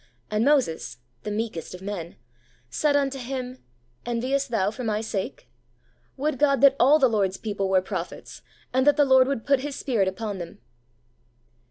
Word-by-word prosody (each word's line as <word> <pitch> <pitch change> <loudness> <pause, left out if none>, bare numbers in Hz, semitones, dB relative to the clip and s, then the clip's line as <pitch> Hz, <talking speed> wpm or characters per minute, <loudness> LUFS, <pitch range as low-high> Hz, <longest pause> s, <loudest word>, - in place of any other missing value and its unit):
And 215 +1 +1
Moses' 260 - +1 0.2
(the - - -5
meekest 210 -6 -4
of 180 - -12
men) 185 -4 -5 0.6
'said 290 - +1
unto 275 -1 0
him, 255 0 -5 0.4
Enviest 255 +4 -1
thou 205 -4 +1
for 250 +3 -7
my 215 -2 0
sake? 220 +2 -4 0.7
Would 285 -1 -1
God 280 -2 +3
that 275 -1 +7
all 280 +5 +6
the 270 -4 +4
Lord's 200 -5 0
people 200 -3 -3
were 190 -1 +3
prophets, - - -6 0.3
and 260 +2 +2
that 290 0 +5
the 290 - +5
Lord 260 -1 +5
would 275 -5 -2
put 275 -2 +3
His 285 +1 -5
Spirit 225 -8 0
upon 200 +1 -4
them 170 -1 -8
240 Hz, 170 wpm, -25 LUFS, 205-275 Hz, 0.7 s, that